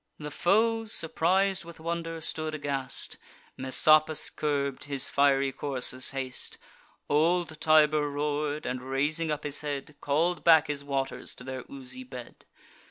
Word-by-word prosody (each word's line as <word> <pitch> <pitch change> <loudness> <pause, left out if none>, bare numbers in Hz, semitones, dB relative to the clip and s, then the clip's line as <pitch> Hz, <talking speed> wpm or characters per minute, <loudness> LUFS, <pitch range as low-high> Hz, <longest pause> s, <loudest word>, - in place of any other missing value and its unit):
The 150 -1 -7
foes, 220 +7 +2
surpris'd 185 +3 +1
with 170 -1 -12
wonder, 165 0 -4
stood 155 0 -2
aghast; 140 -3 -3 0.4
Messapus 155 +4 +4
curb'd 140 -3 -1
his 140 -2 -2
fiery 140 -1 +3
courser's 130 -2 -1
haste; 130 -2 -5 0.5
Old 160 +1 +1
Tiber 155 -1 +4
roar'd, 150 +1 -2
and, 125 0 -3
raising 145 +5 -1
up 150 0 -3
his 145 -1 -1
head, 145 0 -5
Call'd 165 +5 0
back 160 -2 +6
his 145 -2 -4
waters 135 -1 -3
to - - -11
their 130 0 -6
oozy 130 -2 -6
bed. 125 -2 -11
150 Hz, 135 wpm, -28 LUFS, 135-160 Hz, 0.5 s, back